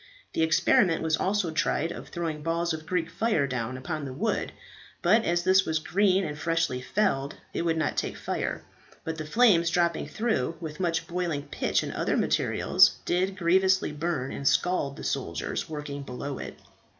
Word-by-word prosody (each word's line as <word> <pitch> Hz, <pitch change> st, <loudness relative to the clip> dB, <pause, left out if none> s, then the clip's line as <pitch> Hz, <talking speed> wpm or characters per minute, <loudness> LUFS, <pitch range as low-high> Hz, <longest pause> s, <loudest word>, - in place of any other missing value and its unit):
The -, -, 0 dB
experiment 165 Hz, +2 st, +3 dB
was 160 Hz, -1 st, +2 dB
also 190 Hz, -2 st, 0 dB
tried 160 Hz, +1 st, 0 dB
of -, -, -8 dB
throwing 165 Hz, -3 st, -4 dB
balls 165 Hz, +1 st, 0 dB
of 160 Hz, 0 st, -7 dB
Greek 180 Hz, -3 st, 0 dB
fire 165 Hz, -3 st, +1 dB
down 125 Hz, -1 st, -3 dB
upon 155 Hz, +4 st, -4 dB
the 135 Hz, -2 st, -5 dB
wood; 210 Hz, +10 st, -1 dB, 0.5 s
but 215 Hz, +6 st, +4 dB
as 175 Hz, 0 st, +1 dB
this 190 Hz, +1 st, +5 dB
was 160 Hz, -3 st, 0 dB
green 190 Hz, +3 st, +2 dB
and 150 Hz, -2 st, -4 dB
freshly 165 Hz, -6 st, 0 dB
felled 140 Hz, -3 st, 0 dB, 0.2 s
it -, -, -1 dB
would 165 Hz, -1 st, +1 dB
not 155 Hz, -2 st, -1 dB
take -, -, -2 dB
fire, -, -, -3 dB, 0.4 s
but 160 Hz, 0 st, -4 dB
the 155 Hz, -, -4 dB
flames 170 Hz, -3 st, +4 dB
dropping 170 Hz, -1 st, +1 dB
through, 215 Hz, -, -1 dB
with 160 Hz, -1 st, -7 dB
much 170 Hz, -3 st, 0 dB
boiling 170 Hz, -5 st, -2 dB
pitch -, -, 0 dB
and -, -, -5 dB
other -, -, 0 dB
materials, -, -, +3 dB
did 185 Hz, +2 st, 0 dB
grievously 190 Hz, 0 st, +3 dB
burn 150 Hz, -3 st, -2 dB
and 140 Hz, -, -3 dB
scald 160 Hz, -6 st, +1 dB
the -, -, -8 dB
soldiers -, -, -3 dB
working 145 Hz, -2 st, -5 dB
below 135 Hz, +1 st, -6 dB
it. -, -, -7 dB
165 Hz, 175 wpm, -27 LUFS, 150-180 Hz, 0.5 s, this